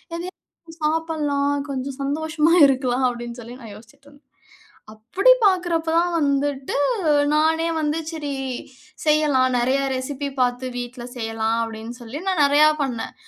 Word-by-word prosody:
எதையாவது 340 Hz, -1 st, -11 dB
சாப்பிடலாம், 300 Hz, -3 st, 0 dB, 0.2 s
கொஞ்சம் 265 Hz, +1 st, -5 dB
சந்தோஷமா 310 Hz, +3 st, +1 dB
இருக்கலாம்." 260 Hz, -1 st, 0 dB
அப்படீன்னு 240 Hz, 0 st, -7 dB
சொல்லி 240 Hz, +2 st, -10 dB
நான் 220 Hz, -3 st, -10 dB
யோசிச்சுட்டுருந்தேன். 280 Hz, +7 st, -19 dB, 0.7 s
அப்படி 300 Hz, -, +3 dB
பார்க்கிறப்ப 350 Hz, -4 st, +1 dB
தான் 350 Hz, +1 st, +1 dB
வந்துட்டு 280 Hz, -1 st, -1 dB, 0.6 s
நானே 320 Hz, +2 st, +2 dB
வந்து, 305 Hz, +1 st, -1 dB
"சரி 295 Hz, -3 st, -4 dB, 0.7 s
செய்யலாம், 290 Hz, -4 st, +3 dB
நெறைய 260 Hz, +3 st, +1 dB
ரெசிபி 280 Hz, +2 st, -4 dB
பார்த்து 250 Hz, +1 st, 0 dB
வீட்ல 245 Hz, 0 st, -7 dB
செய்யலாம்." 225 Hz, -1 st, -1 dB
அப்படீன்னு 225 Hz, +2 st, -7 dB
சொல்லி 240 Hz, +6 st, -7 dB
நான் 350 Hz, -6 st, +2 dB
நெறைய 290 Hz, +2 st, +5 dB, 0.2 s
பண்னேன். 245 Hz, -4 st, -4 dB
280 Hz, 120 wpm, -22 LUFS, 245-315 Hz, 0.7 s, நெறைய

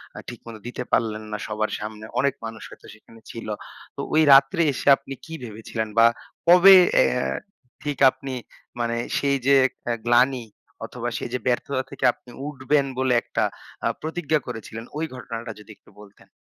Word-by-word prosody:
আ -, -, -10 dB
ঠিকমতো 115 Hz, -2 st, -10 dB
দিতে 125 Hz, 0 st, -5 dB
পারলেন 110 Hz, -1 st, 0 dB
না 105 Hz, -, -2 dB
সবার 110 Hz, 0 st, -2 dB
সামনে। 110 Hz, 0 st, -7 dB
অনেক 140 Hz, -1 st, +2 dB
মানুষ 110 Hz, 0 st, -7 dB
হয়তো -, -, -15 dB
সেখানে 115 Hz, +1 st, -18 dB
ছিল। 115 Hz, -, -8 dB, 0.5 s
তো -, -, -4 dB
ওই 160 Hz, -, +5 dB
রাত্রে 135 Hz, +4 st, +5 dB
এসে 130 Hz, -, -6 dB
আপনি 135 Hz, 0 st, -9 dB
কি 160 Hz, -, -10 dB
ভেবেছিলেন 110 Hz, 0 st, -5 dB
বা 115 Hz, -, +8 dB, 0.4 s
কবে 180 Hz, +3 st, +9 dB, 0.2 s
অ্যাঁ -, -, +2 dB, 0.5 s
ঠিক 145 Hz, -2 st, -3 dB
আপনি 130 Hz, 0 st, -7 dB, 0.5 s
মানে 115 Hz, 0 st, -1 dB, 0.2 s
সেই 140 Hz, -1 st, +1 dB
যে 140 Hz, -, +5 dB
একটা 120 Hz, -2 st, -7 dB
গ্লানি 125 Hz, +1 st, +3 dB, 0.4 s
অথবা -, -, -5 dB
সেই -, -, -5 dB
যে 125 Hz, -, -1 dB
ব্যর্থতা 130 Hz, +2 st, 0 dB
থেকে 140 Hz, -, -3 dB
আপনি -, -, -20 dB, 0.2 s
উঠবেন 140 Hz, 0 st, +1 dB
বলে 130 Hz, -1 st, +2 dB
একটা -, -, -1 dB, 0.4 s
অ্যাঁ -, -, 0 dB
প্রতিজ্ঞা 155 Hz, -1 st, -1 dB
করেছিলেন 115 Hz, +1 st, -7 dB
ওই 160 Hz, -, -1 dB
ঘটনাটা 115 Hz, -1 st, -6 dB
যদি 105 Hz, +1 st, -13 dB
একটু -, -, -24 dB
বলতেন? 105 Hz, -1 st, -18 dB
125 Hz, 170 wpm, -24 LUFS, 115-140 Hz, 0.5 s, কবে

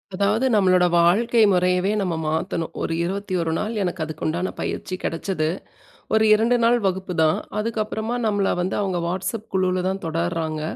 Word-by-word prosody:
அதாவது 205 Hz, +6 st, +1 dB
நம்மளோட 185 Hz, -3 st, +4 dB
வாழ்க்கை 225 Hz, +8 st, +3 dB
முறையவே 180 Hz, +1 st, +2 dB
நம்ம 180 Hz, -4 st, -1 dB
மாத்தணும். 165 Hz, +1 st, -2 dB
ஒரு 165 Hz, -, -1 dB
21 185 Hz, -3 st, -2 dB
நாள் 215 Hz, +2 st, -2 dB
எனக்கு 175 Hz, -2 st, -2 dB
அதுக்கு 155 Hz, -1 st, -7 dB
உண்டான 170 Hz, +4 st, -1 dB
பயிற்சி 185 Hz, -, -3 dB
கெடச்சது. 165 Hz, -1 st, -2 dB, 0.7 s
ஒரு 220 Hz, 0 st, +4 dB
2 230 Hz, +3 st, +3 dB
நாள் 240 Hz, +1 st, +4 dB
வகுப்புதான். 180 Hz, -4 st, +1 dB, 0.2 s
அதுக்கப்பறமா, 220 Hz, +1 st, -2 dB
நம்மள 205 Hz, -2 st, +1 dB
வந்து 180 Hz, +2 st, -1 dB
அவங்க 190 Hz, -3 st, -1 dB
வாட்ஸப் 190 Hz, +5 st, -3 dB
குழுவில 185 Hz, -1 st, +1 dB
தான் 190 Hz, +1 st, -3 dB
தொடர்றாங்க. 165 Hz, -1 st, -2 dB
185 Hz, 145 wpm, -22 LUFS, 170-205 Hz, 0.7 s, நம்மளோட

